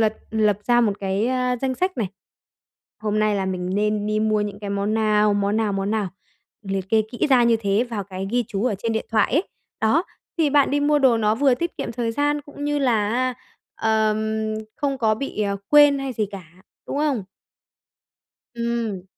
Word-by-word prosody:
lật 220 Hz, -1 st, +2 dB, 0.2 s
lập 215 Hz, -2 st, +2 dB
ra 240 Hz, 0 st, +4 dB
một 220 Hz, -4 st, +2 dB
cái, 195 Hz, +2 st, 0 dB
a, 250 Hz, 0 st, 0 dB
danh 260 Hz, +1 st, -2 dB
sách 370 Hz, +6 st, -1 dB
này, 215 Hz, -5 st, 0 dB, 0.9 s
hôm 215 Hz, 0 st, 0 dB
nay 215 Hz, -1 st, +2 dB
là 195 Hz, -1 st, -1 dB
mình 185 Hz, -1 st, -3 dB
nên 210 Hz, 0 st, 0 dB
đi 215 Hz, 0 st, 0 dB
mua 215 Hz, -1 st, +2 dB
những 205 Hz, -1 st, -4 dB
cái 205 Hz, -1 st, -5 dB
món 200 Hz, +2 st, -1 dB
nào, 210 Hz, -1 st, +3 dB
món 205 Hz, +1 st, 0 dB
nào, 220 Hz, -2 st, +1 dB
món 195 Hz, +1 st, -1 dB
nào, 215 Hz, -3 st, 0 dB, 0.5 s
liệt 195 Hz, -2 st, -3 dB
kê 220 Hz, -1 st, +4 dB
kỹ 240 Hz, -, 0 dB
ra 255 Hz, -2 st, +6 dB
như 235 Hz, -1 st, +4 dB
thế 200 Hz, +2 st, +1 dB
vào 225 Hz, -5 st, -4 dB
cái 190 Hz, 0 st, -6 dB
ghi 245 Hz, +1 st, +1 dB
chú 200 Hz, +2 st, -2 dB
ở 250 Hz, -4 st, +1 dB
trên 225 Hz, +2 st, -2 dB
điện 220 Hz, -, -2 dB
thoại 225 Hz, 0 st, +2 dB
ấy. 310 Hz, +7 st, +3 dB, 0.4 s
Đó, 280 Hz, +11 st, +3 dB, 0.3 s
thì 310 Hz, -3 st, +3 dB
bạn 285 Hz, -1 st, +4 dB
đi 290 Hz, +1 st, +1 dB
mua 295 Hz, +1 st, +3 dB
đồ 260 Hz, -4 st, +4 dB
nó 215 Hz, -1 st, +2 dB
vừa 270 Hz, +2 st, +3 dB
tiết 335 Hz, +6 st, -4 dB
kiệm -, -, -3 dB
thời 235 Hz, -1 st, -2 dB
gian 290 Hz, +3 st, 0 dB
cũng 285 Hz, 0 st, -8 dB
như 295 Hz, 0 st, 0 dB
là, 245 Hz, 0 st, +1 dB, 0.4 s
a, 220 Hz, 0 st, +1 dB
ờm, 220 Hz, 0 st, -1 dB, 0.2 s
không 275 Hz, -2 st, -1 dB
có 220 Hz, -3 st, +2 dB
bị, 220 Hz, -2 st, -3 dB
ờ, 200 Hz, -1 st, -1 dB
quên 290 Hz, -1 st, +6 dB
hay 270 Hz, -1 st, -3 dB
gì 215 Hz, -3 st, -1 dB
cả, 195 Hz, -3 st, -7 dB, 0.4 s
đúng -, -, -4 dB
không? 285 Hz, -9 st, 0 dB, 1.3 s
Ừm. 235 Hz, -5 st, -2 dB
220 Hz, 210 wpm, -23 LUFS, 210-255 Hz, 1.3 s, ra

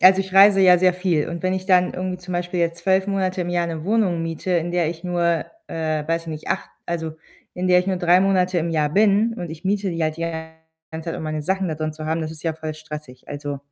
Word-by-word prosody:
Also, 190 Hz, +1 st, +7 dB
ich 190 Hz, -1 st, -6 dB
reise 195 Hz, 0 st, +7 dB
ja 180 Hz, -2 st, +7 dB
sehr 185 Hz, 0 st, +3 dB
viel 180 Hz, -5 st, 0 dB
und 170 Hz, +1 st, -5 dB
wenn 185 Hz, -, +1 dB
ich 185 Hz, 0 st, -3 dB
dann 180 Hz, -2 st, +4 dB
irgendwie 185 Hz, 0 st, -3 dB
zum 180 Hz, 0 st, -8 dB
Beispiel 175 Hz, 0 st, -2 dB
jetzt 170 Hz, 0 st, 0 dB
12 190 Hz, 0 st, +2 dB
Monate 190 Hz, -2 st, -1 dB
im 175 Hz, -, -2 dB
Jahr 175 Hz, -1 st, +1 dB
'ne 160 Hz, -1 st, -5 dB
Wohnung 195 Hz, -5 st, +1 dB
miete, 165 Hz, +2 st, -3 dB
in 175 Hz, 0 st, +1 dB
der 175 Hz, -3 st, +1 dB
ich 165 Hz, 0 st, -6 dB
nur, 170 Hz, -2 st, +1 dB, 0.2 s
äh, 155 Hz, -2 st, -2 dB
weiß 165 Hz, 0 st, 0 dB
ich 165 Hz, -, -18 dB
nicht, 155 Hz, -1 st, -6 dB
8 -, -, -2 dB, 0.2 s
also, 160 Hz, -2 st, -3 dB, 0.4 s
in 180 Hz, +1 st, -2 dB
der 180 Hz, 0 st, +6 dB
ich 180 Hz, -, -6 dB
nur 190 Hz, -1 st, 0 dB
3 180 Hz, +1 st, +4 dB
Monate 185 Hz, -2 st, +2 dB
im 170 Hz, 0 st, -1 dB
Jahr 155 Hz, -2 st, +1 dB
bin 210 Hz, +6 st, +3 dB
und 175 Hz, -6 st, -6 dB
ich 160 Hz, +2 st, -9 dB
miete 195 Hz, 0 st, 0 dB
die 165 Hz, -1 st, -2 dB
halt 155 Hz, 0 st, 0 dB
die 165 Hz, -, -5 dB, 0.7 s
ganze 160 Hz, +1 st, -5 dB
Zeit, -, -, -4 dB
um -, -, -6 dB
meine 155 Hz, -1 st, -3 dB
Sachen 190 Hz, +2 st, 0 dB
da 155 Hz, -, -2 dB
drin 155 Hz, 0 st, -3 dB
zu 155 Hz, 0 st, -7 dB
haben, 160 Hz, +1 st, 0 dB
das 155 Hz, -, -3 dB
ist 160 Hz, -1 st, -10 dB
ja 160 Hz, -2 st, 0 dB
voll 155 Hz, -1 st, -5 dB
stressig. 150 Hz, -4 st, -9 dB
Also 145 Hz, -1 st, -5 dB
175 Hz, 265 wpm, -22 LUFS, 160-185 Hz, 0.7 s, Also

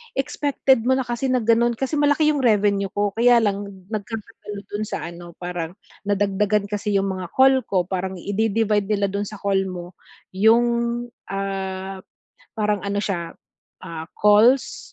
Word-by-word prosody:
expected 270 Hz, -3 st, +1 dB
mo 260 Hz, -, +4 dB
na 265 Hz, -, +1 dB
kasi 240 Hz, +2 st, -2 dB
na 255 Hz, -1 st, +2 dB
gano'n, 235 Hz, +1 st, +3 dB
kasi 270 Hz, +5 st, -2 dB
malaki 290 Hz, +1 st, +3 dB
'yong 290 Hz, -3 st, 0 dB
revenue 205 Hz, -3 st, +2 dB
ko 205 Hz, 0 st, +1 dB
kaya 240 Hz, +1 st, +5 dB
lang 205 Hz, -1 st, 0 dB, 0.3 s
nagkakatalo 210 Hz, -1 st, -6 dB
do'n 210 Hz, +1 st, -3 dB
sa -, -, -4 dB
ano, 175 Hz, 0 st, -11 dB
parang 175 Hz, -1 st, -4 dB, 0.3 s
nadagdagan 205 Hz, +1 st, +1 dB
kasi 210 Hz, 0 st, -2 dB
'yong 195 Hz, 0 st, +2 dB
mga 185 Hz, -1 st, -4 dB
call 265 Hz, 0 st, +5 dB
ko, 185 Hz, -2 st, +1 dB
parang 190 Hz, 0 st, -3 dB
i 200 Hz, -, -5 dB
idi-divide 215 Hz, -1 st, +1 dB
nila 205 Hz, -1 st, +1 dB
do'n 200 Hz, +1 st, -2 dB
sa 210 Hz, 0 st, -9 dB
call 195 Hz, -1 st, +1 dB
mo 180 Hz, -2 st, -6 dB, 0.5 s
'yong, 225 Hz, +4 st, +5 dB, 0.6 s
ah, 195 Hz, -1 st, -4 dB, 0.6 s
parang 210 Hz, -2 st, 0 dB
ano 200 Hz, 0 st, -1 dB
siya, 175 Hz, -5 st, -3 dB, 0.5 s
ah, 165 Hz, -2 st, -6 dB
calls 215 Hz, +6 st, +3 dB
205 Hz, 155 wpm, -22 LUFS, 195-230 Hz, 0.6 s, kaya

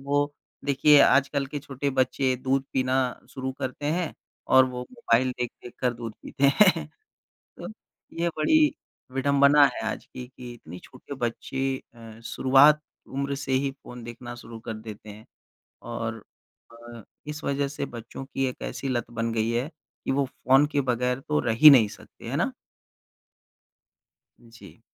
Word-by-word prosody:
वो 145 Hz, +1 st, 0 dB, 0.3 s
देखिए, 145 Hz, +1 st, +5 dB
आजकल 140 Hz, 0 st, +3 dB
के 145 Hz, +2 st, -5 dB
छोटे 140 Hz, 0 st, -3 dB
बच्चे 130 Hz, 0 st, +1 dB
दूध 135 Hz, 0 st, +1 dB
पीना 130 Hz, 0 st, +1 dB, 0.3 s
शुरू 130 Hz, 0 st, -4 dB
करते 130 Hz, +2 st, -4 dB
हैं 175 Hz, -1 st, -2 dB, 0.3 s
और 130 Hz, 0 st, +7 dB
वो 125 Hz, -1 st, -5 dB
मोबाइल 130 Hz, -, +1 dB
देख-देख 120 Hz, 0 st, -6 dB
कर 125 Hz, -1 st, +1 dB
दूध 115 Hz, -2 st, -7 dB
पीते 140 Hz, -, -3 dB, 0.2 s
हैं। 170 Hz, -7 st, +5 dB, 0.7 s
तो -, -, -7 dB, 0.5 s
ये 170 Hz, -, +2 dB
बड़ी 305 Hz, -, +4 dB, 0.4 s
विडंबना 140 Hz, +2 st, +5 dB
है -, -, -5 dB
आज -, -, -6 dB
की, 125 Hz, -1 st, -9 dB
कि 125 Hz, -1 st, -10 dB
इतनी 90 Hz, -6 st, -11 dB
छोटे 130 Hz, +2 st, -10 dB
बच्चे 135 Hz, +2 st, -2 dB, 0.2 s
अ, 115 Hz, -1 st, -12 dB
शुरुआत 140 Hz, +5 st, +5 dB, 0.3 s
उम्र 140 Hz, +1 st, -3 dB
से 135 Hz, -1 st, -4 dB
ही 135 Hz, +1 st, +1 dB
फ़ोन 125 Hz, -3 st, -12 dB
देखना 120 Hz, +1 st, -8 dB
शुरू 115 Hz, -1 st, -10 dB
कर 115 Hz, 0 st, -6 dB
देते 110 Hz, -1 st, -10 dB
हैं 105 Hz, +2 st, -13 dB, 0.7 s
और 115 Hz, -1 st, -4 dB, 0.5 s
अ, 120 Hz, 0 st, -12 dB, 0.3 s
इस 150 Hz, +1 st, -6 dB
वज़ह 140 Hz, 0 st, 0 dB
से 145 Hz, -, -4 dB
बच्चों 115 Hz, +3 st, -8 dB
की 135 Hz, 0 st, -2 dB
एक 125 Hz, -, -8 dB
ऐसी 135 Hz, -, -4 dB
लत 120 Hz, -2 st, -2 dB
बन 115 Hz, 0 st, -2 dB
गई 110 Hz, 0 st, 0 dB
है 120 Hz, +5 st, -1 dB, 0.4 s
कि -, -, -2 dB
वो 140 Hz, +1 st, +1 dB
फ़ोन 135 Hz, +2 st, +3 dB
के -, -, +4 dB
बग़ैर 125 Hz, +1 st, -1 dB
तो 150 Hz, +2 st, 0 dB
रह 115 Hz, -, 0 dB
ही 155 Hz, -, +13 dB
नहीं 120 Hz, -7 st, +6 dB
सकते। -, -, -13 dB
है -, -, -2 dB
ना? -, -, 0 dB, 2.0 s
जी। 115 Hz, 0 st, -15 dB
130 Hz, 160 wpm, -26 LUFS, 120-140 Hz, 2.0 s, ही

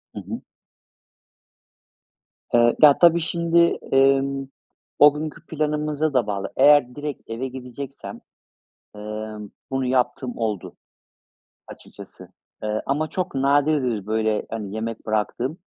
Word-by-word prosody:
Hı -, -, -4 dB
hı. -, -, -7 dB, 2.1 s
Iıı, 120 Hz, 0 st, +4 dB
ta 145 Hz, -2 st, +8 dB
tabii 170 Hz, -1 st, +5 dB
şimdi, 170 Hz, +1 st, +2 dB, 0.2 s
ımm, 135 Hz, 0 st, +2 dB, 0.5 s
o 145 Hz, 0 st, +8 dB
günkü 155 Hz, +2 st, -6 dB
planımıza 150 Hz, -1 st, -1 dB
da 125 Hz, -5 st, +2 dB
bağlı. 100 Hz, -2 st, -3 dB
Eğer 145 Hz, -4 st, +5 dB
direkt 145 Hz, -5 st, -6 dB
eve 115 Hz, +4 st, -3 dB
gideceksem, 130 Hz, +1 st, -8 dB, 0.8 s
ımm, 105 Hz, 0 st, -7 dB, 0.2 s
bunu 135 Hz, 0 st, -1 dB
yaptığım 125 Hz, 0 st, -1 dB
oldu 110 Hz, -5 st, -3 dB, 0.9 s
açıkçası. -, -, -13 dB, 0.3 s
Iıı, 105 Hz, 0 st, -2 dB
ama 150 Hz, +3 st, 0 dB
çok 185 Hz, -1 st, -4 dB
nadirdir, 135 Hz, -5 st, +1 dB
böyle, 110 Hz, 0 st, 0 dB
hani, 105 Hz, -3 st, -5 dB
yemek 115 Hz, +1 st, -5 dB
bıraktığım. 115 Hz, -, -2 dB
135 Hz, 110 wpm, -23 LUFS, 110-150 Hz, 2.1 s, ta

